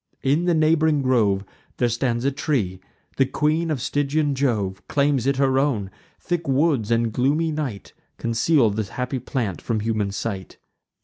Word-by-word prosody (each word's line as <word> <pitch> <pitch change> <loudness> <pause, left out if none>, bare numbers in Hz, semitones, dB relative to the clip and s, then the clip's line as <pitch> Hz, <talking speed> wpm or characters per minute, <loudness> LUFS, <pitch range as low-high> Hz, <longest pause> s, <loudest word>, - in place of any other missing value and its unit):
In 145 +6 +2
the 175 -1 +3
neighb'ring 155 -2 +3
grove 105 -7 +2 0.3
There 120 - +2
stands 120 +1 -1
a 140 - +3
tree; 120 - -1 0.4
the 135 - +4
queen 155 +4 0
of 150 -4 -1
Stygian 145 +1 0
Jove 105 -8 -1
Claims 140 -3 +1
it 140 - +2
her 135 -1 +3
own; 115 -9 0 0.3
thick 175 -3 -3
woods 135 -5 +2
and 115 -1 +1
gloomy 150 +7 +1
night 140 -10 -4 0.2
Conceal 115 +1 +2
the 105 -1 -3
happy 125 +1 -2
plant 115 - -3
from 110 -3 -1
human 110 -2 -1
sight. 100 -1 -5
130 Hz, 160 wpm, -23 LUFS, 110-145 Hz, 0.4 s, the